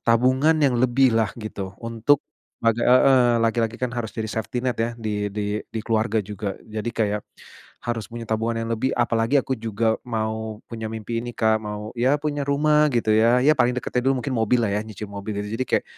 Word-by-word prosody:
tabungan 130 +7 +4
yang 130 -3 +3
lebihlah 120 -4 +3
gitu 100 -4 -6
untuk, 115 +5 +2 0.4
bag 115 +1 +3
heeh, 125 -1 +5
laki-laki 115 0 0
kan 125 -1 -3
harus 115 -3 -3
jadi 110 -1 -2
safety 115 +2 -3
net 125 - 0
ya 115 - +1
di 105 -2 -2
di 105 +1 -2
di 110 - -4
keluarga 110 -1 +1
juga 100 -1 -5
jadi 110 +1 -4
kayak, 105 -2 -1 0.6
harus 115 -4 -2
punya 120 0 -6
tabungan 115 +1 -1
yang 115 - -5
lebih 130 +4 0
apalagi 115 +2 +1
aku 130 - -2
juga 110 0 0
mau 110 -1 -3
punya 110 -1 -5
mimpi 110 +1 -4
ini 120 0 -5
Kak 110 -1 +2
mau 105 0 -5
ya 130 +4 +3
punya 145 -1 -2
rumah 150 +2 +3
gitu 120 -4 0
ya, 115 +3 +4
ya 155 - +6
paling 125 +1 +3
deketnya 125 0 -1
dulu 130 -2 +1
mungkin 135 -3 -2
mobillah 115 -1 +2
ya 105 - 0
nyicil 105 -1 -7
mobil 100 +1 -5
jadi 115 +5 -3
kayak, - - +1
115 Hz, 190 wpm, -23 LUFS, 110-125 Hz, 0.6 s, ya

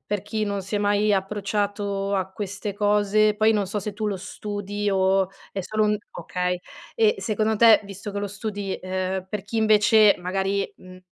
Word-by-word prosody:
per 205 -2 -2
chi 215 +1 -2
non 200 -1 -2
si 195 +3 -6
è - - +1
mai 205 +1 +2
approcciato 200 0 -1
a 190 -1 -1
queste 200 0 -5
cose 210 +1 +3
poi 220 +1 +3
non 205 -2 0
so 205 +2 -3
se 205 +1 -5
tu 215 +1 -3
lo 200 - -1
studi 205 +1 -4
o 190 0 +2 0.2
è 195 - -3
solo 215 +3 0
un 210 0 +2
okay 180 -1 -2 0.4
e, 445 -1 +3
secondo 215 0 0
te, 225 0 +7
visto 200 +1 -7
che 200 - -4
lo 205 - -2
studi, 205 -1 -4
uhm, 185 0 -2
per 210 -1 -4
chi 215 +3 -3
invece 215 -1 +5
magari, 195 +2 -1
mhmm 185 0 -14
205 Hz, 190 wpm, -24 LUFS, 195-210 Hz, 0.4 s, te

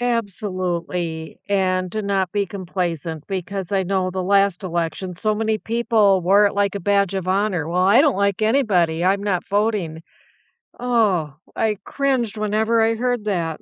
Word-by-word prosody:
Absolutely, 180 -7 -3
and 185 -2 +1
to 215 - -2
not 195 -2 0
be 205 +1 0
complacent 175 -5 -4
because 195 0 -4
I 195 -1 +1
know 185 0 0
the 185 0 -3
last 195 0 +2
election 175 +1 -3
so 215 +5 0
many 220 0 0
people 220 -3 +2
wore 195 +4 +4
it 205 - +2
like 200 -1 0
a 200 - -3
badge 200 0 +1
of 190 -2 -3
honor. 190 -4 0
"Well, 175 +2 0
I 205 +8 +6
don't 290 -7 +2
like 200 +1 0
anybody. 195 -9 +2
I'm 195 +2 +2
not 195 -4 -1
voting." 200 -6 -1 0.8
Oh, 210 - +1 0.2
I 215 -2 0
cringed 255 -6 -1
whenever 215 +2 +1
I 225 0 +2
heard 245 -1 -1
that. 170 -6 -2
195 Hz, 165 wpm, -21 LUFS, 180-215 Hz, 0.8 s, I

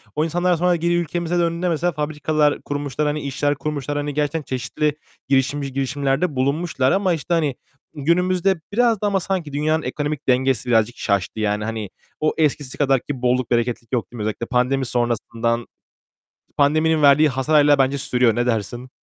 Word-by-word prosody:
o 155 - +1
insanlar 175 +3 0
daha 175 - +3
sonra 180 +1 +2
geri 170 +1 0
ülkemize 175 +1 -1
döndüğünde 170 +1 0
mesela 170 +2 0
fabrikalar 150 0 0
kurmuşlar, 145 0 -2
hani 150 +1 -1
işler 145 +1 -1
kurmuşlar. 145 0 -3
Hani 145 0 -2
gerçekten 150 +2 -1
çeşitli 140 +3 -2 0.3
girişimci 135 0 0
girişimlerde 140 +3 -1
bulunmuşlar 140 0 0
ama 190 -2 +2
işte 165 +2 -3
hani 150 -6 +1 0.4
günümüzde 180 +4 +1
biraz 230 -2 +2
da 210 - +1
ama 200 -1 +1
sanki 175 -6 -3
dünyanın 155 +2 0
ekonomik 145 +2 -3
dengesi 130 -1 +1
birazcık 115 0 +2
şaştı 100 +1 -1
yani. 105 0 0
Hani 110 -3 -4 0.3
o 155 - +1
eskisi 145 -3 0
kadar 135 -2 +3
ki 135 0 -6
bolluk, 125 -1 +1
bereketlik 120 -1 -1
yok, 120 - -1
değil 120 - -10
mi? - - -5
Özellikle 110 +2 -3
pandemi 130 +2 +1
sonrasından, 120 -1 -1 0.9
pandeminin 155 +2 +3
verdiği 145 +2 +6
hasar 135 +4 0
hâlâ 145 -1 +6
bence 135 +1 +2
sürüyor. 125 -4 +1
Ne 120 +1 0
dersin? 120 +2 -2
145 Hz, 170 wpm, -21 LUFS, 125-160 Hz, 0.9 s, verdiği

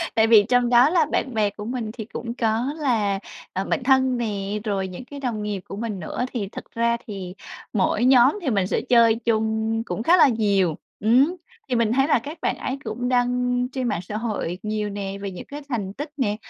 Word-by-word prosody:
Tại 220 0 +4
vì 220 -2 +7
trong 245 -1 +3
đó 245 +4 +6
là 335 -3 +3
bạn 260 - -1
bè 215 -2 +2
của 210 +1 -9
mình 235 -2 -3
thì 225 -3 -7
cũng 230 +1 -6
có 235 +4 0
là, 220 -9 +1 0.3
ờ, 190 +1 -2
bạn 260 - -1
thân 260 -1 +3
nè, 205 -2 -2
rồi 195 -3 -1
những 185 +7 -9
cái 285 +2 -9
đồng 235 -6 -3
nghiệp 205 -2 -2
của - - -6
mình 210 -2 -4
nữa, 180 +8 -3
thì 215 -6 -2
thật - - -7
ra 235 0 +2
thì 190 -4 -6 0.4
mỗi 215 +3 +1
nhóm 260 +7 +5
thì 310 - -1
mình 195 -5 +1
sẽ - - 0
chơi 230 -2 +5
chung 220 -1 0
cũng 225 - -3
khá 350 +6 +5
là 315 - +7
nhiều, 200 - +2 0.2
ừm. 255 - +4 0.3
Thì 250 - +1
mình 230 -1 +2
thấy 270 +2 +3
là 300 - +3
các 295 +8 -8
bạn - - 0
ấy 260 - -3
cũng 245 +3 -3
đăng 250 0 +1
trên 255 -2 -2
mạng 175 - -1
xã 210 +4 -5
hội 205 -6 -3
nhiều 215 -1 -2
nè, 200 -1 -5
về 200 -1 -4
những 180 - -8
cái 290 +1 -8
thành 205 -7 -3
tích 290 +6 -6
nè. 210 -7 0
230 Hz, 225 wpm, -23 LUFS, 205-250 Hz, 0.4 s, vì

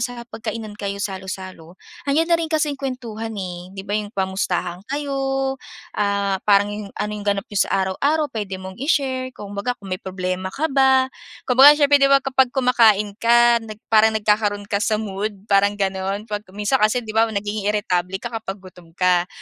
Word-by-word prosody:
sa 240 0 -4
hapagkainan 220 -2 -6
kayo 200 -1 -4
salo-salo, 185 -3 -6 0.3
nandiyan 325 +4 +2
na - - +6
rin 325 - -2
kasing 300 -3 -1
kuwentuhan 235 -4 -5
eh. 180 -2 -6
'Di 195 - -6
ba 205 - -5
yung 210 -1 -1
kamustahan 190 -3 -2
kayo 285 0 -3 0.8
ah, 200 -2 0
parang 205 0 +5
yung, 205 -1 -6
ano 210 - -2
yung 210 - -5
ganap 200 0 0
n'yo 205 - -4
sa - - +2 0.2
araw-araw 290 +10 0
puwede 205 -4 -4
mong 190 +3 -10
i-share. 265 -3 0
Kumbaga 205 +4 -4
kung 195 -2 -9
may 185 - -3
problema 185 0 -3
ka 275 +11 -4
ba, 265 -1 +4 0.3
kumbaga 275 +3 +8
siyempre 285 -1 +4
kapag 270 -1 +4
kumakain 225 -5 +4
ka 235 0 +5
nag 215 -2 -9 0.2
parang 220 0 +5
nagkakaroon 210 -1 +1
ka 200 0 -2
sa 215 0 +1
mood 205 -1 -4
parang 200 0 +3
gano'n. 195 +1 -2
'Pag 210 -2 -6
minsan 210 +6 +1
kasi 225 +3 +2
'di 215 - -6
ba 225 +1 +3
nagiging 205 -1 -2
iritable 185 -3 0
ka 235 +4 -7
kapag 210 -3 -5
gutom 175 -2 -15
ka. 180 -1 +2
210 Hz, 175 wpm, -21 LUFS, 195-245 Hz, 0.8 s, kumbaga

